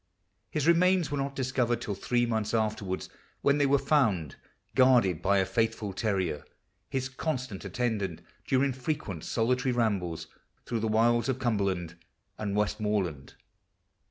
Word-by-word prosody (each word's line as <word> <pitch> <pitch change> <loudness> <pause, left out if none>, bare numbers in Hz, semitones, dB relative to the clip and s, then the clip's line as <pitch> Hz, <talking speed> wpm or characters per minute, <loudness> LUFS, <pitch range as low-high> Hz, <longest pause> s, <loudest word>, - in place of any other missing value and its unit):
His 150 -2 -1
remains 170 -1 +4
were 145 - -1
not 140 0 -2
discovered 125 -3 0
till 105 - -3
three 120 +5 0
months 110 -1 -1
afterwards, 105 -4 -1 0.3
when 140 +1 +3
they 145 - +4
were 140 +1 +4
found 130 - +1 0.4
guarded 125 - +4
b} - - -2
r 100 -1 +5
a - - +1
faithful 110 0 -1
terrier, 95 -8 -1 0.5
his 130 -1 -1
constant 130 - -4
atten 110 +3 -1
dant 95 -5 -4 0.3
during 135 +1 +2
frequent 130 - -4
solitary 125 +2 +1
rambles 95 -9 0 0.4
through 115 - -2
the 110 - -1
wilds 115 +3 +3
of 130 - +1
Cumberland 100 -9 -1 0.4
and 100 -2 -2
Westmoreland. 105 -8 -1
115 Hz, 145 wpm, -29 LUFS, 100-130 Hz, 0.5 s, r